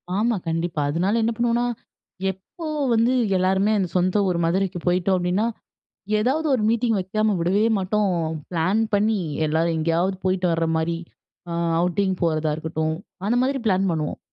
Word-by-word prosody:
ஆமா, 225 +3 +1
கண்டிப்பா. 165 -1 -1
அதனால 185 +9 +1
என்ன 230 - +1
பண்ணுவோம்னா, 240 0 +1 0.7
எப்போ 190 - -11 0.3
வந்து 230 +3 +3 0.2
எல்லாருமே 190 +3 +2 0.2
சொந்த 185 +3 +2
ஊர் 180 -2 0
மதுரைக்கு 185 +1 0
போயிட்டோம் 180 +2 +2
அப்படினா, 180 +5 0 0.7
ஏதாவது 270 +9 +1
ஒரு 240 - 0
மீட்டிங் 230 -1 +1
வெக்காம 215 +3 0
விடவே 190 +5 +2
மாட்டோம். 195 0 0 0.4
பிளான் 180 +6 +1
பண்ணி 210 +1 +2 0.3
எல்லாரும் 160 +2 +1
எங்கேயாவது 170 +4 +1
போயிட்டு 185 -1 +1
வர்ற 165 0 +1
மாரி 165 +1 -1 0.5
அ - - -3 0.3
அவுட்டிங் 185 +2 +1
போறதா 155 -2 +1
இருக்கட்டும், 160 0 -2 0.3
அந்த 235 +4 +2
மாதிரி 270 +1 0
பிளான் 195 -1 +2
பண்ணுவோம். 155 -3 -2
185 Hz, 140 wpm, -23 LUFS, 170-215 Hz, 0.7 s, வந்து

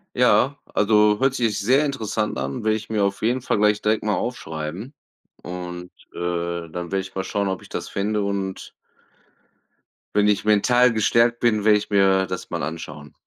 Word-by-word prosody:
Ja, 125 +3 +3 0.2
also, 105 0 +3
hört 135 0 +2
sich 110 -4 0
sehr 130 +8 +3
interessant 110 -6 -2
an. 70 +7 -4
Werde 110 0 +2
ich 110 0 -7
mir 110 -2 0
auf 100 0 -1
jeden 125 +4 +1
Fall 120 - 0
gleich 105 0 +3
direkt 110 0 +1
mal 105 -1 +1
aufschreiben 90 - -5 0.5
und, 90 0 -7 0.2
äh, - - -12
dann 85 -1 -3 0.2
werde 95 - +1
ich 95 0 -10
mal 95 - -3
schauen, 100 +1 -2
ob 95 -1 -3
ich - - -15
das - - -5
finde 105 +1 -1
und 100 -1 -3 1.5
wenn 105 0 +4
ich 105 -1 +2
mental 120 +4 +4
gestärkt 115 +2 +2
bin, 110 -3 +1
werde 105 -1 +6
ich 105 0 -6
mir 95 -1 +4
das 90 -1 -6
mal - - -3
anschauen. 75 -2 -7
105 Hz, 180 wpm, -22 LUFS, 95-110 Hz, 1.5 s, werde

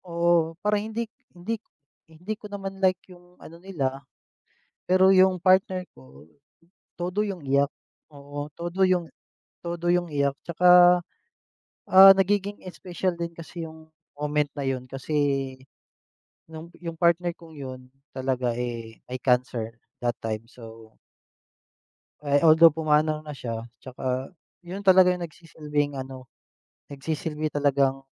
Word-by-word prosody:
oo, 170 -2 +1
para 210 0 +2
hindi 220 +2 -3 0.3
hindi 215 +6 -4 0.5
hindi 175 +7 -6
ko 210 - -9
naman 195 -1 -7
like 185 -1 +3 0.2
yung 180 0 -19
ano 170 +1 -13
nila. 140 -8 -3 0.9
Pero 185 +1 +5
yung 185 -2 +4
partner 185 0 +3
ko, 65 +1 -17 0.7
todo 180 +4 -2
yung 195 -4 -5
iyak, 140 +1 +1 0.4
oo, 145 0 -7
todo 175 +3 0
yung 180 -3 +1 0.5
todo 175 0 -1
yung 175 -1 0
iyak 140 -2 0
tsaka, 180 +1 +6 0.9
ah, 195 +1 +9
nagiging 200 +1 +1 0.2
special 180 0 -3
din 170 0 -4
kasi 165 0 -8
yung 160 0 -16 0.2
moment 150 0 0
na 140 - -3
'yon 130 -1 -3
kasi, 135 +4 -6 1.3
no'ng 160 +1 -10
yung 170 -1 -6
partner 170 +1 +1
kong 165 -3 -15
'yon, 130 -2 -7 0.3
talaga, 130 -2 -1
eh, 115 -2 -6
may 130 - -3
cancer, 125 -3 0 0.2
that 120 -1 -1
time, 110 0 -4
so 115 -2 -14 1.3
Eh, 145 0 +3
although 160 0 +7
pumanaw 155 0 +1
na 150 -2 -9
siya, 115 -2 -5
tsaka 130 +1 -4 0.3
'yon 180 +3 -6
talaga 185 -2 +6
yung 180 - -5
nagsisilbing 150 -4 -4
ano, 130 -1 -9 0.6
nagsisilbi 150 +2 -4
talagang, 140 -2 +1
160 Hz, 130 wpm, -25 LUFS, 135-180 Hz, 1.3 s, ah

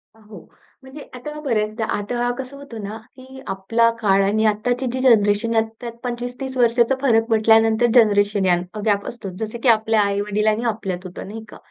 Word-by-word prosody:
अ, - - -22
हो. 210 -3 -13 0.4
म्हणजे 265 +3 -11
आता 300 +5 -7
बऱ्याचदा 220 -4 -1
आता 240 +4 -2
कसं 265 +1 -7
होतं 240 -6 -9
ना 205 +2 -6 0.2
की 265 0 -13
आपला 225 +5 +1
काळ 195 -3 +3
आणि 215 +3 +1
आत्ताची 245 +5 0
जी 260 - -2
जनरेशन, 225 -3 +3
ह्यात 225 -1 +2 0.2
त्यात 240 -1 -5
25-30 245 +2 -5
वर्षांचा 240 +1 +3
फरक 225 -5 +3
म्हटल्यानंतर 225 +1 +4
जनरेशन 205 -3 +3
या 180 - +4 0.2
अ, 215 - -6
गॅप 200 -2 +1
असतोच. 200 -6 -7
जसं 220 +2 -6
की - - +1
आपल्या 220 -1 +3
आई-वडील 205 +1 -1
आणि 215 +2 +1
आपल्यात 190 -4 -6
होतं, 185 +1 -8
नाही 220 +2 -8
का? - - -12
225 Hz, 185 wpm, -21 LUFS, 210-245 Hz, 0.4 s, म्हटल्यानंतर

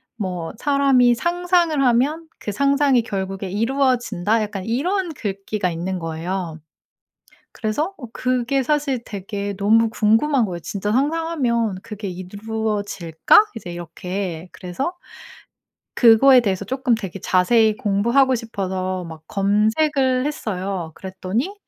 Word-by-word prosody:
뭐 180 -6 -4
"사람이 275 -4 +3
상상을 345 -2 +1
하면 280 +7 +2
그 210 - -4
상상이 280 +1 +3
결국에 195 -2 -4
이루어진다." 230 -2 +1
약간 205 -3 -4
이런 340 - -1
글귀가 200 -3 -3
있는 180 +3 -3
거예요. 165 +1 -4 0.9
그래서 295 - -2
어 250 - -8
그게 255 +1 0
사실 280 -3 0
되게 200 0 -5
너무 220 +3 +3
궁금한 230 +4 +2
거예요. 175 -4 -4
'진짜 205 +3 -3
상상하면 265 - 0
그게 210 -2 -6
이루어질까?' 205 -2 0 0.2
이제 175 -5 -7
이렇게 180 0 -5
그래서 230 - -4 1.0
그거에 250 +3 +7
대해서 195 -4 -1
쪼끔 255 -2 +1
되게 195 -4 -6
자세히 215 +5 +3
공부하고 240 +4 +2
싶어서 185 -5 -3
막 160 -2 -9
검색을 255 +7 +1
했어요. 190 - -3
그랬더니 190 - -3
220 Hz, 285 characters per minute, -21 LUFS, 190-265 Hz, 1.0 s, 그거에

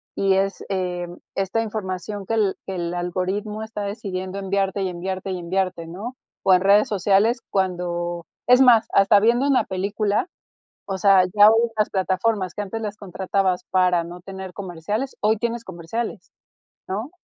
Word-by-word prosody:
y 195 -1 +2
es, 195 0 0
eh, 180 -2 -2 0.3
esta 195 +4 0
información 205 -2 -4
que 225 - -3
el 205 -3 +2
que 190 - -5
el 170 -1 -3
algoritmo 190 +5 -2
está 220 -1 -6
decidiendo 195 -2 -4
enviarte 195 0 -1
y 185 - -1
enviarte 185 +2 -4
y 185 - -3
enviarte, 180 -1 -2
¿no? 210 +9 -7 0.3
O 190 - +5
en 180 - +5
redes 200 +2 +5
sociales 210 +4 +2
cuando 175 -2 -2 0.2
es 250 +1 +7
más, 235 -4 +6
hasta 200 +1 +6
viendo 235 +5 +3
una 275 -2 +3
película, 200 - -1 0.6
o 195 -1 -2
sea, 195 -1 +6
ya 205 +1 +9
hoy 225 +1 +4
en 230 - -16
las 215 - +1
plataformas 190 0 0
que 205 - -2
antes 225 +3 -5
las 210 -1 -4
contratabas 190 -1 -1
para 180 -2 +3
no 175 +1 -9
tener 190 -1 -8
comerciales, 200 +8 -4
hoy 215 +1 +3
tienes 235 +1 -2
comerciales, 190 +3 -5 0.6
¿no? 215 +9 -3
195 Hz, 165 wpm, -23 LUFS, 185-215 Hz, 0.6 s, ya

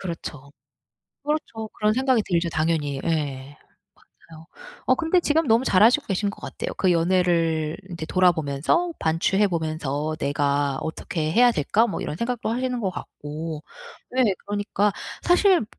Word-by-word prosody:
그렇죠. 150 -6 -7 0.7
그렇죠 285 -7 -3
그런 215 0 +2
생각이 260 -2 +2
들죠 170 -1 0
당연히 155 -4 -1
예. 145 -4 -2 0.7
맞아요. 160 0 -13 0.4
어 - - +5
근데 340 +2 +2
지금 315 -1 +1
너무 230 +2 +3
잘 190 -5 +4
하시고 250 +6 +5
계신 200 +1 0
것 - - -13
같아요. - - -5
그 185 - +2
연애를 165 -2 +1
인제 165 -2 -5
돌아보면서 175 - +2
반추해 170 +6 +2
보면서 155 -2 -2
'내가 140 -1 0
어떻게 160 0 -3
해야 245 +3 +6
될까?' 210 +9 +2
뭐 - - -4
이런 150 - -4
생각도 235 +1 -2
하시는 250 +1 -1
것 190 -3 -1
같고. 155 -1 -7 0.5
네 250 -6 +3
그러니까 205 0 0 0.3
사실 360 - +4
175 Hz, 310 characters per minute, -24 LUFS, 155-230 Hz, 0.7 s, 해야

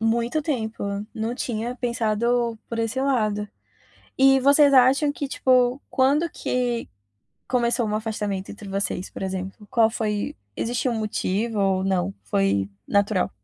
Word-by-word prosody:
Muito 235 +6 +1
tempo, 230 -9 -3 0.3
não 225 +2 -3
tinha 240 -1 -3
pensado 235 0 0
por 230 - -4
esse 230 +3 -1
lado. 215 -6 0 0.7
E 270 0 +6
vocês 280 +1 +5
acham 265 +3 +5
que 285 - -4
tipo, 255 0 +2
quando 285 +5 +2
que 245 -5 -2 0.6
começou 240 -1 +1
um 210 - -2
afastamento 210 -3 -3
entre 205 0 -9
vocês, 195 -1 -2
por - - -8
exemplo, 190 +2 -5
qual 225 0 +3
foi 210 -2 -2 0.2
existiu 245 +2 -1
um 225 - -2
motivo 215 +1 -1
ou 195 -1 +2
não, 180 - 0
foi 100 -1 0 0.2
natural? 200 -2 +2
230 Hz, 140 wpm, -24 LUFS, 205-250 Hz, 0.7 s, E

